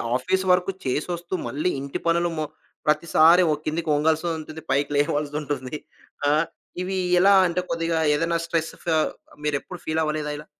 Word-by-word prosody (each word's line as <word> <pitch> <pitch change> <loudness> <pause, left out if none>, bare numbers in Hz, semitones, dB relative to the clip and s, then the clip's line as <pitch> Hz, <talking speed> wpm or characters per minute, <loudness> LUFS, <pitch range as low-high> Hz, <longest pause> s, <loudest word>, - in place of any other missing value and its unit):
Office 185 +9 0
వరకు 180 +1 +3
చేసొస్తూ, 170 +7 -2
మళ్ళీ 150 +6 -1
ఇంటి 140 0 -4
పనులు 170 +1 +2
మొ 155 - -1 0.4
ప్రతిసారి 160 +3 +5
ఓ - - +3
కిందికి 160 +1 -2
ఒంగాల్సుంటుంది. 160 +1 -1
పైకి 140 +2 +1
లేవాల్సుంటుంది. 145 -1 -1 0.5
ఆహ్, 155 +3 +3 0.4
ఇవి 190 +1 -2 0.2
ఎలా 195 +2 +6
అంటే 175 +1 -1
కొద్దిగా 165 0 0 0.2
ఏదైనా 165 +2 0
స్ట్రెస్ 165 -1 -1
ఫ - - -17 0.6
మీరెప్పుడు 150 +4 -3
ఫీల్ 160 0 0
అవ్వలేదా 155 -1 -2
ఇలా? 150 - -10
160 Hz, 140 wpm, -24 LUFS, 150-170 Hz, 0.6 s, ఎలా